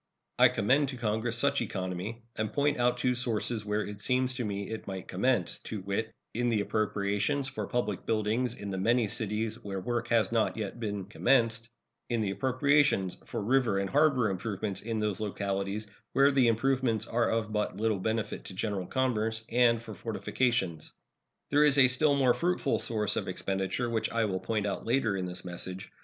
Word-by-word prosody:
I - - +8
commend 135 +6 +2
to 130 - -6
Congress 115 +1 -1
such 140 +2 +2
economy, 95 +2 -4
and 110 0 -2
point 145 +2 +1
out 120 0 +2
two 125 0 +1
sources 120 -2 0
where 105 0 -1
It 105 0 -7
seems 130 +3 +1
to 125 -1 -3
me 100 -1 -4
it 110 - -6
might 95 -1 -5
commence, 100 -1 0
to 105 -3 -5
wit, 100 +4 -2 0.2
in 120 +2 0
the 110 -3 +2
appropriations 105 +6 0
for 110 -7 -4
public 105 -5 -2
buildings 115 +2 0
in 100 -1 -6
the 95 - -3
many 115 +3 +2
cities 110 +2 -2
where 100 -1 -4
work 120 +4 -2
has 115 -4 +2
not 115 -1 +1
yet 110 +1 -4
been 100 -4 -3
commenced; 115 +1 +2 0.4
in 120 -2 0
the 105 -3 0
appropriations 130 -2 +2
for - - -3
river 120 -3 +2
and 100 0 -1
harbor 140 -7 +3
improvement 100 0 -3
in 115 0 -2
those 105 -2 -1
localities 100 0 -2 0.3
where 140 +1 +5
the 135 -3 +4
improvements 115 -1 +1
are 120 0 +1
of 110 -1 -1
but 105 -3 -1
little 110 -2 +1
benefit 110 +2 -2
to 95 - -8
general 95 -2 -2
commerce, 110 -4 0
and 115 -1 +4
for 110 -2 -8
fortifications. 95 -5 -1 0.6
There 145 +1 +5
is 145 -1 +4
a 135 -2 +8
still 145 +3 +3
more 130 -3 +4
fruitful 175 -5 0
source 105 -2 0
of - - -2
expenditure, 95 +5 -2
which 115 -2 -1
I 115 -1 +1
will 95 -3 -1
point 110 0 -1
out 100 - -2
later 115 -4 +1
in 95 -1 -2
this 90 +1 -5
message. 90 +1 -5
110 Hz, 185 wpm, -30 LUFS, 100-125 Hz, 0.6 s, I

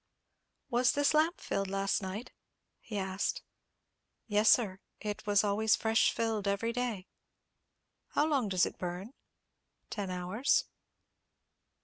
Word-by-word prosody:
"Was 245 0 +3
this 290 +1 +2
lamp 315 +3 +3
filled 195 0 -2
last 195 +1 0
night?" 195 +5 -5 0.5
he 215 - -6
asked. 190 - -2 0.8
"Yes, 210 0 +3
sir; 195 -6 +3 0.2
it 210 0 -5
was 205 0 +4
always 215 +2 +3
fresh 225 0 +3
filled 220 -3 -1
every 200 +4 0
day." 240 -6 -2 1.1
"How 295 - +3
long 275 -9 +1
does 185 -2 +3
it - - -7
burn?" 180 +6 -5 0.8
"Ten 200 -3 -3
hours." 185 +8 +1
210 Hz, 120 wpm, -32 LUFS, 195-235 Hz, 1.1 s, was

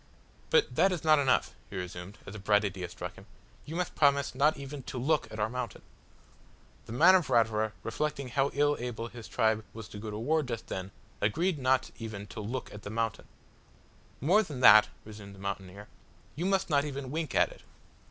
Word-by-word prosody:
"But 480 -2 +3
that 195 - +4
is 175 -4 -3
not 155 -2 +5
enough," 135 -2 +2 0.2
he - - -9
resumed, 90 +2 -6
as 95 - -8
a 110 - -7
bright 105 +1 +3
idea 95 -3 -4
struck 90 0 -7
him, 95 - -15 0.4
"you 160 - -6
must 180 0 -2
promise 140 -1 +3
not 145 +4 +3
even 140 0 -7
to 130 - -7
look 145 +5 +1
at 110 - -7
our 105 - +2
mountain." 125 -1 -5 1.0
The - - -8
man 165 +10 +6
of 180 -5 +3
Ratura 110 -2 +2
reflecting 140 +3 -2
how 135 +3 +1
ill 145 +1 +3
able 120 -1 -4
his 115 -2 -10
tribe 110 0 +1
was 115 -2 -7
to 105 - -8
go 110 +1 -6
to 105 - -5
war 155 +8 +1
just 120 -5 -5
then, 95 0 -4 0.3
agreed 165 - +1
not 130 0 +2
even 110 -3 -6
to - - -7
look 120 +5 -5
at 105 - -9
the 100 - -7
mountain! 115 -1 -2 0.9
"More 180 - +4
than 150 -11 -6
that" 110 -3 +9 0.2
resumed 105 -2 -10
the - - -15
mountaineer, 100 +1 -6 0.5
"you 175 +5 -1
must 195 -1 +1
not 145 -3 +3
even 140 -3 -5
wink 155 -3 -3
at - - +4
it." - - -14
120 Hz, 200 wpm, -30 LUFS, 105-145 Hz, 1.0 s, that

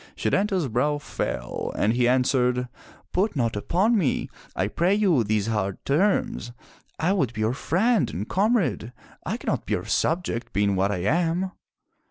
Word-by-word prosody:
'* - - -33
Setanta's 195 -6 +1
brow 130 +6 +1
fell 60 - -4
and 110 - +2
he 120 0 +2
answered, 125 0 +2 0.5
"Put 195 0 +1
not 115 -5 0
upon 190 - +2
me, 170 - 0 0.2
I 95 - 0
pray 175 - +1
you, 185 - +3
these 105 -1 0
hard 105 -4 -1
terms. 205 - +1 0.5
I 170 +5 +1
would 140 - 0
be 110 - -4
your 110 +2 +1
friend 205 - +1
and 90 +7 -4
com 215 +6 +2
rade. 125 - -2 0.3
I - - -1
cannot - - -3
be - - +1
your - - -4
subject, 150 -8 -1
being 100 +1 +2
what 95 +2 +1
I 90 -3 -2
am.'' 170 - +1
135 Hz, 170 wpm, -25 LUFS, -, 0.5 s, you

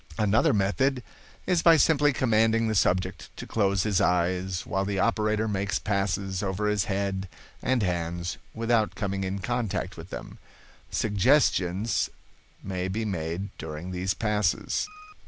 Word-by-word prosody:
"Another 105 +1 +3
method 125 +6 +1 0.4
is 180 -3 +2
by 165 -1 +7
simply 145 -1 +4
commanding 115 -2 +2
the 110 - 0
subject 95 -1 0
to - - -6
close 100 -3 +1
his 105 -3 +1
eyes, 90 0 +1
while 95 0 -1
the 100 0 -2
operator 110 +1 +1
makes 100 -1 -1
passes 95 -1 -1
over 100 +1 -2
his 105 -3 +1
head 95 -1 -2 0.3
and 130 -4 +1
hands 85 -1 -2 0.2
without 115 -1 +1
coming 100 -2 -2
in 95 +1 -2
contact 105 -3 -2
with 85 +2 -9
them. - - -8 0.5
Suggestions 105 -3 +2 0.5
may 95 -1 -3
be 110 +4 -2
made 90 0 -3
during 80 +3 -6
these 95 +1 -1
passes. 105 - 0
100 Hz, 140 wpm, -27 LUFS, 95-110 Hz, 0.5 s, by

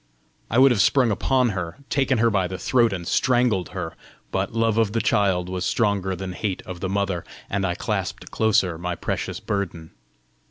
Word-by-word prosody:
I 115 - 0
would 135 +1 +7
have 110 -5 +3
sprung 125 +3 +4
upon 125 +4 +2
her, 90 -5 -4
taken 135 -2 +2
her 115 +1 +3
by 95 -3 +1
the 95 0 -5
throat, 120 +4 +2
and 90 -3 -4
strangled 120 -8 +2
her, - - -5 0.4
but - - -1
love 115 -1 +1
of 110 -2 +1
the 115 - +1
child 95 -4 +2
was 90 0 -3
stronger 100 -4 +1
than 90 0 -5
hate 95 0 -3
of 90 -1 -7
the 95 - -3
mother, 100 -3 -1 0.3
and 100 -1 0
I 90 - -1
clasped - - -3
closer 95 -6 +2
my 90 0 -3
precious - - -3
burden. 85 -5 -4
100 Hz, 190 wpm, -23 LUFS, 90-115 Hz, 0.4 s, would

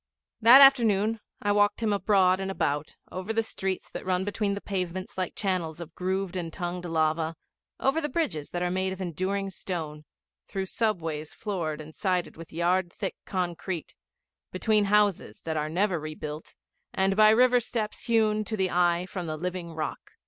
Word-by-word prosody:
That 240 +5 +10
afternoon 225 -5 +5 0.2
I 205 - +2
walked 205 +2 +2
him 215 -2 +2
abroad 190 -2 +3
and 195 0 -3
about, 145 -5 -1 0.2
over 185 +4 -4
the 225 0 +1
streets 190 -3 -3
that - - -6
run 185 0 0
between 205 -1 -1
the - - -4
pavements 185 -2 -4
like 185 -2 -3
channels 180 -5 -1
of 170 -1 -8
grooved 190 +1 -2
and 170 -3 -3
tongued 175 0 -4
lava, 160 0 0 0.4
over 275 +5 +2
the 295 - -2
bridges 185 - -2
that 175 0 -2
are 180 - 0
made 190 +1 0
of 190 - -10
enduring 190 +3 -2
stone, 155 -5 -5 0.4
through 195 -1 -3
subways 165 -8 -2
floored 170 -7 -3
and 155 0 -9
sided 185 -3 -1
with 165 0 -11
yard 175 +2 +1
thick 195 +1 -4
concrete, 180 -2 -3 0.6
between 210 +2 +2
houses 200 - +2
that 160 -1 -2
are 150 0 -1
never 180 +1 +1
rebuilt, 155 0 -7 0.4
and 195 0 +2
by 215 +1 +7
river 245 +3 +5
steps 220 -2 -4
hewn, 215 -2 +2
to 220 +1 -3
the 190 -2 +1
eye, 175 0 +2
from 185 -2 -5
the 155 0 -3
living 180 0 -4
rock. 160 -1 -5
185 Hz, 175 wpm, -27 LUFS, 170-205 Hz, 0.6 s, That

